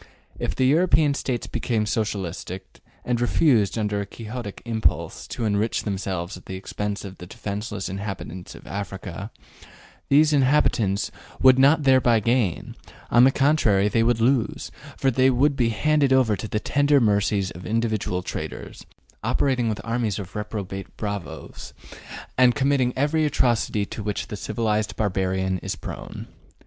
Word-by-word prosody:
If 85 - -2
the 130 - +2
European 155 0 +4
States 125 -3 -2
became 110 -3 -1
Socialistic, 95 -4 -4 0.3
and 120 -1 0
refused, 120 - +3
under 105 -2 -1
a - - -4
Quixotic 110 0 -7
impulse, 115 -2 -1
to 115 - -4
enrich 105 +1 0
themselves 95 -2 -3
at 90 - -14
the 95 - -5
expense 105 +2 -4
of 95 -1 -9
the 90 - -9
defenseless 105 +1 -5
inhabitants 95 -2 -6
of - - -13
Africa, 100 +1 -6 0.8
those 150 +2 +5
inhabitants 130 -8 +2 0.3
would 130 0 +7
not 145 +3 +5
thereby 130 -4 +4
gain; 115 -5 0 0.4
on 120 +1 +7
the 135 - +5
contrary, 130 -9 +3
they 115 +2 +2
would 115 0 +2
lose, 120 -1 +1 0.3
for 135 - +2
they 130 +2 +4
would 140 +3 +2
be 120 -3 +2
handed 145 +4 +2
over 130 -5 +4
to 110 - -6
the 105 - -1
tender 145 +4 +3
mercies 100 -3 +1
of 90 - -9
individual 110 -5 -1
traders, - - -6 0.4
operating 130 -4 +1
with 105 -2 -2
armies 115 -3 -1
of 95 -3 -8
reprobate 100 -2 -5
bravos, 100 -4 -6 0.6
and 125 -1 +6
committing 135 -3 +2
every 150 +4 +1
atrocity 120 -7 +1
to 110 - -7
which 105 -1 -3
the - - -4
civilized 110 0 -1
barbarian 95 -2 0
is - - -4
prone. - - -8
110 Hz, 150 wpm, -24 LUFS, 100-130 Hz, 0.8 s, would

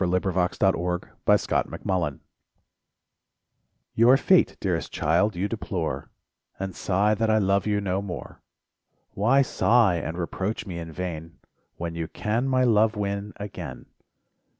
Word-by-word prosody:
SONGS 90 -1 +1 0.5
AND 95 -2 +5
DREAMS 90 +1 0
Vain - - 0
Reproach 85 -7 -2 1.7
Your 120 +4 +6
fate, 185 +5 +3
dearest 90 -4 -2
child, 85 +6 +1
you 95 +3 -1
deplore, 95 -7 -3 0.5
And 95 -1 -4
sigh 100 +3 +1
that 115 +1 0
I 110 - +4
love 100 0 +2
you 105 -1 +1
no 95 -1 -1
more; 100 -3 -7 0.7
Why 130 +7 +3
sigh 115 -7 +3
and 85 0 -4
reproach 95 +5 -3
me 90 -4 -6
in 80 -1 -7
vain, 85 -1 -6 0.4
When 85 -1 -4
you 85 -1 -3
can 115 +9 -1
my 130 -1 +2
love 110 -2 +3
win 100 0 -3
again 100 0 -7
100 Hz, 135 wpm, -25 LUFS, 90-110 Hz, 1.7 s, Your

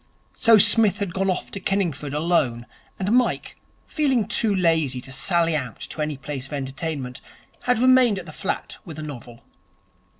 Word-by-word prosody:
So 230 -2 +5
Psmith 210 -1 +5
had 200 -5 -3
gone 195 +1 0
off 180 - -2
to 200 - -5
Kenningford 175 -8 -1
alone, 150 -7 +1 0.3
and 195 +2 -2
Mike, 250 +1 +1 0.3
feeling 265 - +1
too 225 -2 +1
lazy 160 -8 +2
to 130 +1 -9
sally 165 +3 +1
out 130 -6 -4
to 155 - -6
any 150 -2 -2
place 135 -1 -6
of 150 - -11
entertainment, 135 -1 -4 0.4
had 250 -1 +2
remained 255 -3 +5
at 185 - -6
the - - -9
flat 190 - -4
with 165 -7 -9
a 155 - -6
novel. 120 -5 -9
170 Hz, 170 wpm, -23 LUFS, 140-205 Hz, 0.4 s, So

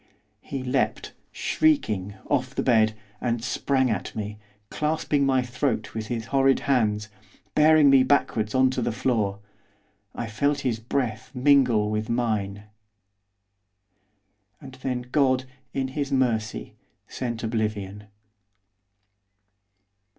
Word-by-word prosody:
He 135 -2 -5
leaped, 130 0 -1 0.2
shrieking, 105 - +1
off 130 -2 -1
the - - 0
bed, 110 -3 +3 0.3
and 120 -2 -1
sprang 130 0 +1
at 110 - -4
me, 105 -1 -5 0.3
clasping 150 -2 0
my 130 -1 +2
throat 125 -3 -2
with 110 -1 -4
his 115 -1 -3
horrid 135 -1 +4
hands, 105 -6 +1 0.4
bearing 155 -1 +6
me 135 -1 +7
backwards 130 -5 +1
on 130 0 +4
to 130 - -2
the 120 - 0
floor; 110 -4 0 0.8
I - - -3
felt 140 +6 0
his 120 -5 -1
breath 115 -2 -2
mingle 125 -6 +4
with 110 0 -2
mine 105 -4 -1 2.0
and 135 -1 -11
then 125 -2 -2
God, 130 0 +1 0.3
in 135 0 -2
His 140 +1 -3
mercy, 110 - -1 0.3
sent 120 -2 -4
oblivion. 105 -3 -3
125 Hz, 115 wpm, -25 LUFS, 110-135 Hz, 2.0 s, me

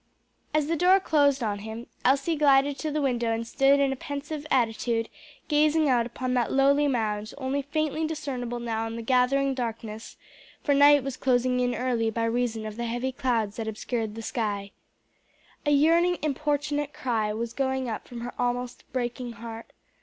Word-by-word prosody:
As 305 -1 +2
the 330 +3 0
door 365 +4 +5
closed 285 -7 +2
on 205 -2 -1
him, 220 +3 -7 0.2
Elsie 275 +5 +2
glided 280 -1 +3
to 310 - -2
the 300 0 -1
window 240 -4 0
and 225 0 -2
stood 275 +4 +3
in 275 -1 +2
a - - -5
pensive 290 +3 -6
attitude 230 -2 +1 0.4
gazing 305 0 +3
out 240 -2 +2
upon 250 +1 -3
that 245 -2 +1
lowly 280 +2 +4
mound, 215 -5 -1
only 275 +1 -1
faintly 310 +2 -1
discernible 260 -6 -4
now 225 -1 -2
in 225 - -6
the 230 - -5
gathering 265 +3 +2
darkness, 225 -3 -5 0.5
for 285 - +2
night 285 0 +6
was 270 -1 -4
closing 250 -1 +2
in 245 -1 +1
early 240 -3 0
by 230 +1 -2
reason 230 -1 -1
of 215 0 -6
the 235 - -2
heavy 240 +3 -2
clouds 230 -5 -1
that 225 -1 -3
obscured 220 0 -3
the 225 - -6
sky. 205 -4 -2 1.0
A - - +4
yearning 335 +5 +4
importunate 295 0 -1
cry 230 -7 -1
was 230 +2 -4
going 265 -1 -1
up 225 - -5
from 240 -2 -8
her 245 +1 -5
almost 245 0 -2
breaking 245 -1 -3
heart. 230 +1 -9
255 Hz, 175 wpm, -27 LUFS, 230-285 Hz, 1.0 s, night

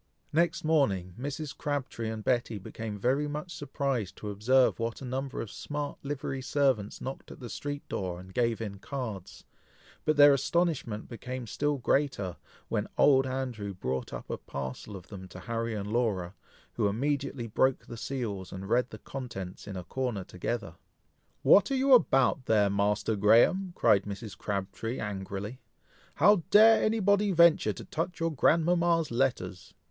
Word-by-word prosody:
Next 170 +1 +2
morning, 105 - +1
Mrs. 145 +2 -4
Crabtree 135 -6 -3
and 110 -1 -5
Betty 120 -3 0
became 105 +2 -6
very 135 +7 +1
much 150 +4 -5
surprised 135 -8 -2
to 105 - -6
observe 125 +7 +3
what 115 0 -2
a - - -5
number 130 +2 -3
of 110 - -6
smart 145 -1 -5
livery 135 -1 -4
servants 130 -7 0
knocked 135 +1 -6
at - - -11
the 120 -4 -7
street 145 +4 -5
door, 90 -2 -3
and 95 +1 -12
gave 115 0 +1
in 100 -3 -5
cards, 110 -8 -6 0.6
but 155 -1 +1
their 145 -1 +9
astonishment 140 -6 0
became 125 +1 -6
still 145 +6 -1
greater, 125 - 0 0.3
when - - -1
old 135 -2 +5
Andrew 125 -7 -4
brought 65 -6 -3
up - - -6
a - - -1
whole - - -3
parcel 70 +9 -5
of 90 -2 -9
them 95 -3 -8
to 90 - -11
Harry 115 -1 -2
and 105 +1 -4
Laura, 100 -7 0 0.4
who 110 -3 +1
immediately 140 +3 -1
broke 130 +4 +1
the - - -8
seals, 110 -7 -4
and 95 +1 -7
read 125 +2 +2
the - - -9
contents 100 -9 -7
in 100 -2 -5
a 90 - -5
corner 125 -6 -3
together. 90 -1 -4 0.7
"What 200 0 +6
are 275 - +1
you 265 +1 +4
about 135 - +4
there, 105 -3 +4
Master 105 +2 +1
Graham?" 120 - +4
cried 100 -1 +4
Mrs. 100 +1 -6
Crabtree, 100 +4 -3
angrily, 100 +3 -5 0.6
"how 205 +7 +6
dare 220 +2 +7
any 220 +1 +2
body 200 0 +3
venture 170 -2 +5
to - - -9
touch 165 +2 -3
your 165 0 0
grandmama's 165 +2 +3
letters?" 115 -7 -1
125 Hz, 165 wpm, -29 LUFS, 105-145 Hz, 0.7 s, their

